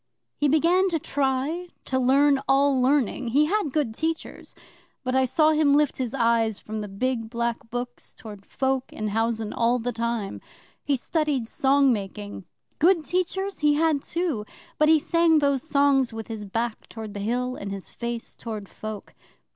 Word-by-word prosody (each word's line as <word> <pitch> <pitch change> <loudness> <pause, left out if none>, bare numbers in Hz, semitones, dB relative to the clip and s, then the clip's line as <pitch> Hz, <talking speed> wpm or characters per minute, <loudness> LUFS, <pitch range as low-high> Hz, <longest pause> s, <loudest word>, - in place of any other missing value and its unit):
He 295 - +1
began 340 +6 +3
to 335 - 0
try 285 +4 -1 0.2
to 260 - 0
learn 275 +2 +4
all 275 -1 +3
learning 260 -2 +1
(he 280 +6 +3
had 375 -3 0
good 280 -6 0
teachers), 320 +6 -4 0.5
but 255 -1 -2
I 265 0 +3
saw 310 +5 +3
him 305 -2 +4
lift 295 -2 +2
his 255 -1 -3
eyes 230 -3 +2
from 215 +1 -6
the 210 - -5
big 225 +3 -2
black 235 -1 -3
books 245 +1 -6
towards 205 -4 -10
folk 265 -1 -1
in 215 -1 -3
housen 225 0 -1
all 235 +1 +2
the 245 +1 -2
time. 230 -3 -3 0.4
He 285 - +1
studied 285 -2 -1
song 275 +1 +3
making 205 -1 -6 0.3
(good 335 -1 +4
teachers 380 +2 -1
he 295 -1 +3
had 310 -2 +2
too!), 335 -11 -2 0.4
but 305 0 +5
he 320 - +7
sang 335 +1 +3
those 280 -3 +2
songs 280 -4 +2
with 225 0 -7
his 220 -2 -5
back 225 +3 -3
toward 220 -2 -7
the 205 - -5
Hill, 250 +4 -1
and 200 -1 -6
his 195 -1 -7
face 235 -1 -5
toward 215 -3 -6
folk. 215 -2 -8
260 Hz, 170 wpm, -25 LUFS, 225-295 Hz, 0.5 s, he